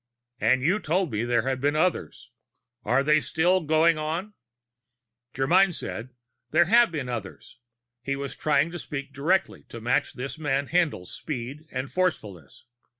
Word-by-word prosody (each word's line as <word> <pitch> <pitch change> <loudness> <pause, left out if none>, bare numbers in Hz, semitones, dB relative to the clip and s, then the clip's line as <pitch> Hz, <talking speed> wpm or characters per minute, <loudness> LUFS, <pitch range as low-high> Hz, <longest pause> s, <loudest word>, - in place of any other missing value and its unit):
"And 130 0 +2
you 180 +8 +2
told 180 0 0
me 110 +1 -1
there 120 -2 +1
had 130 -1 -1
been 145 +2 +1
others. 160 - -1 0.5
Are 125 +5 +2
they 150 +1 +4
still 180 +5 +2
going 160 +1 +3
on?" 165 +7 -3 1.0
Germyn 175 +7 +3
said: 115 +3 -6 0.4
"There 170 +3 +4
have 235 +3 +5
been 145 -6 -4
others." 120 0 -7 0.4
He 140 +2 -2
was 140 0 -5
trying 150 +1 +1
to 175 - -6
speak 140 -2 -6
directly, 170 +8 0
to 115 - -8
match 120 +3 0
this 135 +4 -6
man 140 -2 -1
Haendl's 160 - 0
speed 145 +2 -6
and 130 +1 -4
forcefulness. 105 - -3
145 Hz, 150 wpm, -26 LUFS, 130-170 Hz, 1.0 s, have